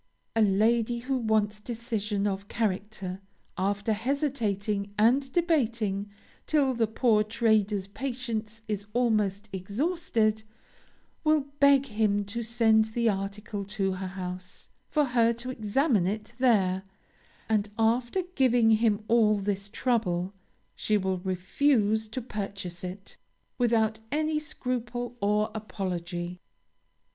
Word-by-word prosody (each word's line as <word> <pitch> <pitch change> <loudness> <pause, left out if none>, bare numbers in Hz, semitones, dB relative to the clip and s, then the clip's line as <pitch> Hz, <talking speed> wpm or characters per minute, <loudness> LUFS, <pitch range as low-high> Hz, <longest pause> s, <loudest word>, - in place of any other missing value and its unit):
A 225 - +3
lady 220 +3 +3
who 255 +3 -2
wants 215 -2 +1
decision 215 -3 -2
of 200 0 -2
character, 195 -3 -3 0.3
after 200 +3 0
hesitating 210 -6 -1
and 255 +5 +3
debating, 230 - +1 0.4
till 285 -4 +3
the 230 -2 +1
poor 220 -1 +3
trader's 215 -3 +1
patience 225 -1 -4
is 205 -2 -3
almost 215 -4 +1
exhausted, 220 - 0 0.8
will 310 -1 +4 0.2
beg 280 -1 +6
him 210 -4 +1
to 225 +4 -4
send 225 -1 +3
the 230 +1 0
article 200 +1 -3
to 195 -1 -1
her 185 0 -4
house, 180 -1 -7 0.2
for 300 -2 +2
her 235 -2 +3
to 240 +2 -4
examine 220 - +1
it 210 +2 -4
there; 195 -7 +3 0.7
and, 215 -2 +1
after 240 +10 +1
giving 245 -6 +4
him 215 -1 +3
all 225 -2 +4
this 200 0 -2
trouble, 200 -6 0 0.4
she 215 - +1
will 190 -2 -1
refuse 215 +4 +1
to 225 +3 -5
purchase 195 -6 -5
it, 185 +2 -8 0.4
without 220 -2 +2
any 305 +1 +1
scruple 245 -4 -3
or 210 +1 +2
apology. 180 -4 -4
215 Hz, 115 wpm, -28 LUFS, 200-240 Hz, 0.8 s, beg